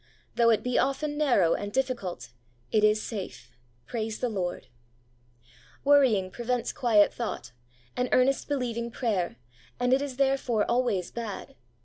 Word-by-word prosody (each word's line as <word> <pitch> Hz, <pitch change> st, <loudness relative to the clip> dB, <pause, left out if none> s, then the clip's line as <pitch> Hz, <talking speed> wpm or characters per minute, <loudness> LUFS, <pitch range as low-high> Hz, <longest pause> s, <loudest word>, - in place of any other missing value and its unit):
Though 235 Hz, -1 st, +4 dB
it 225 Hz, -, +3 dB
be 250 Hz, -1 st, +1 dB
often 290 Hz, +2 st, 0 dB
narrow 245 Hz, -, +3 dB
and 205 Hz, 0 st, -3 dB
diffi 260 Hz, +2 st, 0 dB
cult, 185 Hz, -6 st, -7 dB, 0.4 s
it 215 Hz, -, +3 dB
is 215 Hz, 0 st, +4 dB
safe. 185 Hz, -, -6 dB, 0.3 s
Praise 220 Hz, -2 st, -3 dB
the 250 Hz, -, -1 dB
Lord! 185 Hz, -5 st, -3 dB, 1.2 s
Worrying 255 Hz, -10 st, +4 dB
prevents 240 Hz, +2 st, -2 dB
quiet 220 Hz, -5 st, +4 dB
thought, 230 Hz, -, -5 dB, 0.4 s
and 250 Hz, 0 st, -1 dB
earnest 260 Hz, +2 st, +3 dB
believing 235 Hz, -4 st, -2 dB
prayer, 215 Hz, -, -1 dB, 0.4 s
and 245 Hz, +1 st, +2 dB
it 270 Hz, -, +3 dB
is, 275 Hz, -3 st, -5 dB
therefore, 265 Hz, -5 st, +1 dB
always 235 Hz, -7 st, 0 dB
bad. 230 Hz, -4 st, -6 dB
235 Hz, 140 wpm, -28 LUFS, 210-255 Hz, 1.2 s, Though